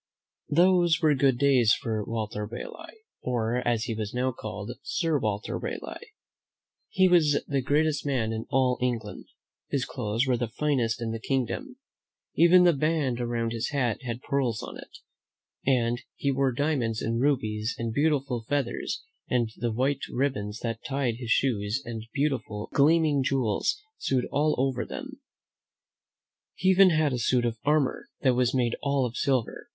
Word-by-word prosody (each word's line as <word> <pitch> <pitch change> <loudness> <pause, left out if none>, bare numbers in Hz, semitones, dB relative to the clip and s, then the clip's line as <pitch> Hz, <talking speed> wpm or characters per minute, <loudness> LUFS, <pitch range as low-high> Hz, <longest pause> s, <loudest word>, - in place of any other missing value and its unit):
Those 175 0 +4
were 155 -3 +4
good 135 -2 +2
days 130 -5 +4
for 110 -2 -3
Walter 105 -1 -3
Raleigh, 330 - -9 0.2
or, 120 -1 -1
as 120 -2 0
he 115 - -2
was 110 0 -4
now 130 +1 +1
called. 105 -1 -6
Sir 165 -1 0
Walter 105 -3 -2
Raleigh. 470 -2 -7 0.8
He 190 0 +4
was 155 -5 +4
the 140 -2 0
greatest 145 +2 +1
man 125 -6 0
in 110 0 -5
all 130 -1 +2
England. 115 -4 -2 0.4
His 135 -2 0
clothes 115 -2 -1
were 130 -2 +1
the 120 0 -1
finest 120 -3 0
in 115 - -2
the 115 - -4
kingdom. 135 - -2 0.6
Even 180 +2 +6
the 175 -1 +6
band 145 -4 0
around 120 -1 -1
his 115 -1 -2
hat 130 -6 -1
had 120 -1 -5
pearls 125 -6 -1
on - - -7
it, - - -11 0.8
and 120 -2 +2
he 140 - 0
wore 135 0 +1
diamonds 125 -5 -1
and 115 +1 -1
rubies 110 -5 0
and 115 -1 -3
beautiful 140 -4 0
feathers, 140 -4 -2 0.3
and 120 -3 +1
the 120 +1 -2
white 135 +4 0
ribbons 110 -6 -2
that 115 -1 -3
tied 135 -4 -1
his 120 -2 -7
shoes 110 -2 +1
had 120 -1 -5
beautiful, 135 -7 -2
gleaming 150 0 +4
jewels 130 - 0 0.2
sewed 130 -2 0
all 150 +2 +2
over 130 -1 0
them. 275 0 -8 1.3
He 190 - +1
even 190 0 +7
had 155 -4 +2
a 125 - -1
suit 120 +1 +2
of 115 -1 -2
armor 150 -2 +1
that 130 -2 +4
was 125 0 +1
made 120 -2 +1
all 140 -2 +1
of 120 0 -5
silver. 130 - -1
130 Hz, 160 wpm, -27 LUFS, 115-145 Hz, 1.3 s, even